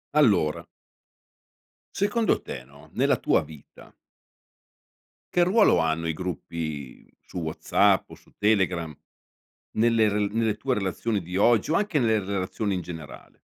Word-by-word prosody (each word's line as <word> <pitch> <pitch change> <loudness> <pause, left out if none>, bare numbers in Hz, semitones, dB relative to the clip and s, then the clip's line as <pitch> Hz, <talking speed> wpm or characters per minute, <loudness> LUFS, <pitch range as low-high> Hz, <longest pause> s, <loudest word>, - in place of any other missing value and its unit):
Allora 100 - +3 1.3
secondo 205 +3 +1
te, 65 - -7
no, 70 +2 -18
nella - - +2
tua - - +2
vita 75 -2 -15 1.4
che 175 - +3
ruolo 205 +5 +4
hanno 80 0 0
i 80 - 0
gruppi 80 -5 -6
su 90 - -8
WhatsApp 80 -2 +2
o - - -9
su - - -18
Telegram 95 -7 +1 0.8
nelle 115 -1 +4
r 105 0 0
nelle 110 -2 0
tue 135 - -1
relazioni 105 +1 -1
di 90 +2 -5
oggi 115 +5 +3
o - - +2
anche 190 -5 +1
nelle 110 -3 +2
relazioni 100 +1 -2
in 90 - -2
generale? 80 -5 -10
95 Hz, 135 wpm, -25 LUFS, 80-115 Hz, 1.4 s, ruolo